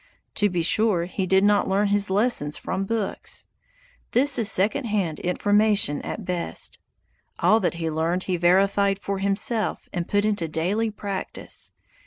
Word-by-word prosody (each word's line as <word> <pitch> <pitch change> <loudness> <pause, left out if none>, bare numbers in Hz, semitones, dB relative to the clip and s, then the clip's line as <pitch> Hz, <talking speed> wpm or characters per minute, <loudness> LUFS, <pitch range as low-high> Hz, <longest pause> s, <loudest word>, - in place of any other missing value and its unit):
To 205 -1 +2
be 175 -2 -1
sure, 190 -1 +2
he 185 +1 -3
did 190 +1 +3
not 205 0 +3
learn 200 +2 +1
his 205 0 +1
lessons 195 -8 +1
from 195 - -3
books. 220 -1 -2 0.7
This 270 +1 +4
is 220 -2 +3
second 215 +8 +1
hand 195 -8 -1
information 205 -3 +2
at 210 - -6
best. 175 -2 -4 0.6
All 220 - +4
that 175 -4 -1
he 165 -1 -3
learned 165 +3 -1
he 185 - -1
verified 195 +3 +3
for 200 0 -4
himself 200 +3 -1
and 175 -1 -3
put 205 0 +1
into 205 -6 0
daily 185 +9 -1
practice. 200 -2 -5
195 Hz, 155 wpm, -24 LUFS, 180-210 Hz, 0.7 s, This